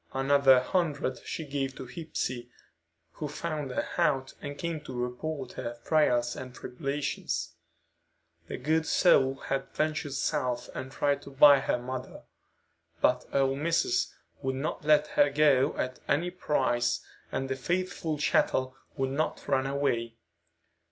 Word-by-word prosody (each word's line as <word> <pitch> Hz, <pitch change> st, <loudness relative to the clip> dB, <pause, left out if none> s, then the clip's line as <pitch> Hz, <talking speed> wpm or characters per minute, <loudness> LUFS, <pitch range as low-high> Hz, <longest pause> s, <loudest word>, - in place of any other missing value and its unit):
Another 135 Hz, -1 st, +5 dB
hundred 150 Hz, -3 st, -1 dB
she 160 Hz, -, -4 dB
gave 135 Hz, -2 st, -3 dB
to -, -, -7 dB
Hepsey, 125 Hz, -4 st, -4 dB, 0.6 s
who 150 Hz, -, -5 dB
found 150 Hz, -1 st, -4 dB
her 125 Hz, -, -2 dB
out 140 Hz, -6 st, +1 dB
and 145 Hz, 0 st, -6 dB
came 170 Hz, -2 st, -3 dB
to 130 Hz, -4 st, -6 dB
report 125 Hz, +2 st, -4 dB
her 120 Hz, -1 st, -5 dB
trials 120 Hz, -6 st, +2 dB
and 125 Hz, -1 st, -8 dB
tribulations. 140 Hz, +3 st, -3 dB, 0.9 s
The -, -, -5 dB
good 160 Hz, +4 st, +1 dB
soul 135 Hz, -7 st, +4 dB
had 135 Hz, 0 st, -3 dB
ventured 155 Hz, -2 st, -1 dB
South 130 Hz, -3 st, -1 dB
and 130 Hz, -, -6 dB
tried 145 Hz, +1 st, +1 dB
to -, -, -10 dB
buy 140 Hz, +1 st, +7 dB
her -, -, 0 dB
mother. 125 Hz, +1 st, -6 dB, 0.8 s
But 125 Hz, 0 st, +2 dB
"ole 135 Hz, -1 st, +2 dB
missis" 170 Hz, -, +1 dB, 0.3 s
would 130 Hz, -1 st, -1 dB
not 140 Hz, +3 st, -3 dB
let 150 Hz, 0 st, +5 dB
her 145 Hz, -, +4 dB
go 145 Hz, -1 st, +3 dB
at 130 Hz, 0 st, -2 dB
any 175 Hz, +4 st, +1 dB
price, 120 Hz, -8 st, +1 dB, 0.3 s
and 135 Hz, 0 st, -2 dB
the 135 Hz, -, -1 dB
faithful 170 Hz, +2 st, -2 dB
chattel 130 Hz, -3 st, +1 dB, 0.2 s
would 135 Hz, 0 st, 0 dB
not 155 Hz, +3 st, -2 dB
run 135 Hz, -1 st, +2 dB
away. 120 Hz, -5 st, -1 dB
135 Hz, 140 wpm, -29 LUFS, 130-150 Hz, 0.9 s, buy